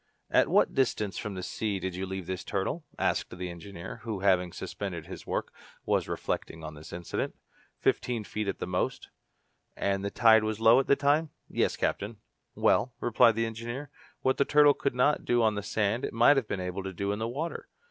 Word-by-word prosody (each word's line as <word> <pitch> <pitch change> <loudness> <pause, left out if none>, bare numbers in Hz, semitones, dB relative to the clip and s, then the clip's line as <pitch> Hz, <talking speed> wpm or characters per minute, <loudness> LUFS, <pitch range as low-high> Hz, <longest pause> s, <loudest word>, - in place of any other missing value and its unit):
"At - - +5
what - - +3
distance 110 -7 0
from 105 -3 -5
the 90 - -5
sea 105 +1 -2
did 95 -1 -3
you 95 +1 -3
leave 95 -1 -5
this 95 +1 -4
turtle?" 100 - -2
asked - - 0
the 90 -1 -4
engineer, 85 +1 -8
who, 110 -5 -5
having 90 -3 +3
suspended - - -5
his - - -9
work, - - -2 0.3
was - - +1
reflecting 80 0 -3
on 80 0 -6
this 75 +1 -11
incident. 85 0 -3 0.4
"Fifteen 120 -3 0
feet 105 0 -4
at 100 - -2
the - - -3
most," 90 0 -2 0.7
replied - - -7
Herbert. 100 - +3
"And 100 - -5
the - - 0
tide 110 0 +5
was 110 0 -2
low 115 +2 +7
at 135 - -1
the 140 - +5
time?" 145 +3 +2 0.2
"Yes, - - 0
captain." 105 +2 -1 0.4
"Well," 125 +4 +2
replied 115 -1 +4
the 115 0 +1
engineer, 120 +5 -5 0.3
"what 130 - +2
the - - +4
turtle 145 0 +6
could 140 -3 -2
not 145 +4 +3
do 120 -1 +2
on 110 -1 +3
the 105 - -3
sand 105 +3 0
it - - -3
might 120 +6 +6
have 130 -5 0
been 95 - -2
able 90 +1 -3
to 95 0 -5
do 100 +3 -2
in 105 - -2
the 110 - -1
water. 150 +8 -4
105 Hz, 215 wpm, -29 LUFS, 95-120 Hz, 0.7 s, low